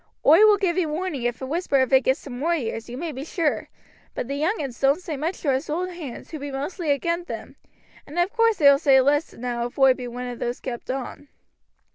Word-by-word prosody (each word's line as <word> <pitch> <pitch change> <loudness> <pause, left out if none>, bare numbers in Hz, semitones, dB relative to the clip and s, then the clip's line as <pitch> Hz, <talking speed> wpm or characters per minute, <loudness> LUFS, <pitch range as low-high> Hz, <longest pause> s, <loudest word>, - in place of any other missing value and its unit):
"Oi 315 +5 +7
will 420 -1 +6
give 375 -3 0
ee 355 - +1
warning 310 -2 -3
if 240 +1 -2
a - - -2
whisper 295 -1 0
of 260 0 +1
it 265 - +7
gets 265 +3 +1
to 280 - -9
moi 300 +8 0
ears, 225 -5 -4
you 245 - -6
may 330 +2 -4
be 270 -1 -6
sure, 320 -1 -1 0.5
but - - -3
the 275 - -3
young 315 +10 0
uns 265 -5 -5
doan't 275 +4 +3
say 340 -4 -5
much 320 +6 -3
to 285 - +1
us 265 +4 -2
old 360 +4 -2
hands, 315 -9 -8
who 315 - -5
be 285 +1 -5
mostly 290 +5 -4
agin 335 +5 0
them, - - -7 0.5
and 300 - -9
ov 350 +4 +1
course 455 -2 +3
they 295 - +1
will 280 0 +7
say 275 -4 +5
less 290 +4 +1
now 240 0 -3
if 245 - -16
oi 270 -1 +6
be 255 -1 -7
one 245 +1 -6
of 245 -1 -6
those 240 +1 -3
kept 240 -3 -6
on." 270 +2 -5
285 Hz, 250 wpm, -24 LUFS, 260-335 Hz, 0.5 s, Oi